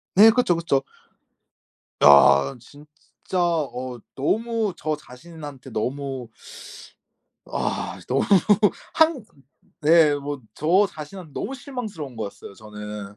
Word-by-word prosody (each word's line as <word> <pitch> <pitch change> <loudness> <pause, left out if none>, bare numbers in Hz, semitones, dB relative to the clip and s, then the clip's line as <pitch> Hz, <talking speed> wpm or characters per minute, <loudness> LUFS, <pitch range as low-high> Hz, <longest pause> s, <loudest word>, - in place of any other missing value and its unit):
네. 210 +4 +9
그쵸, 240 -6 +2
그쵸. 165 -5 0 1.2
야. 70 -1 +7
진짜 145 +5 -16 0.6
어 130 -7 -2 0.2
너무 220 - -1
저 155 0 -2
자신한테 145 -1 -11
너무 130 +2 -4 1.2
아. - - -3
이 - - -14
너무 - - +1 0.7
한 320 -6 +3 0.6
네 155 -1 +5
뭐 145 -1 -5
저 180 +7 +3
자신한테 160 +1 -10
너무 270 - -4
실망스러운 215 - -7
거였어요 100 -2 -7
저는. 105 -1 -9
150 Hz, 195 characters per minute, -23 LUFS, 125-185 Hz, 1.2 s, 네